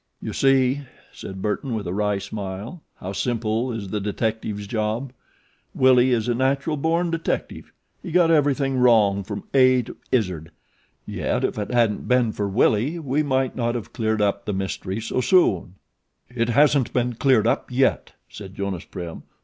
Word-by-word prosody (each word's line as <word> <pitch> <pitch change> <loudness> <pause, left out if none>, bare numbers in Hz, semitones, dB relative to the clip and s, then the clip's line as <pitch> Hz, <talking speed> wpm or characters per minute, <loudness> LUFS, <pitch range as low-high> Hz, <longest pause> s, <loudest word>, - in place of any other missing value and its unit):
"You - - -5
see," 135 0 +3 0.3
said 95 0 -8
Burton, 115 +4 -2
with 105 -3 -4
a 85 - -3
wry 105 0 0
smile, 100 - -6
"how 95 +2 -7
simple 115 +2 -1
is 110 -4 -5
the 105 +1 -2
detective's 105 0 -2
job. 110 +4 -2 0.6
Willie 130 -1 +5
is 115 -2 +1
a 120 - +2
natural 135 +5 0
born 165 +4 0
detective. 165 0 -3 0.3
He 180 - -7
got 170 -1 +4
everything 140 -3 +2
wrong 105 -5 +4
from - - -6
A 130 -2 +5
to - - -10 0.2
Izzard, 90 -10 0 0.6
yet - - -2
if - - -1
it 105 - -3
hadn't 115 -4 +1
been 125 -3 +3
for 105 -1 -2
Willie 115 - +2
we 145 -2 -1
might 135 -3 0
not 120 -1 -1
have 115 - -6
cleared 110 -2 0
up 100 0 0
the 105 - -2
mystery 95 +1 -3
so 115 +3 -2
soon." 100 - +2 0.6
"It 115 -1 0
isn't 145 -4 +3
all 125 0 +1
cleared 130 -6 +4
up 115 - 0
yet," 130 +1 +1
said 95 -2 -10
Jonas 100 -3 -4
Prim. 85 -2 -7
115 Hz, 165 wpm, -23 LUFS, 105-130 Hz, 0.6 s, Willie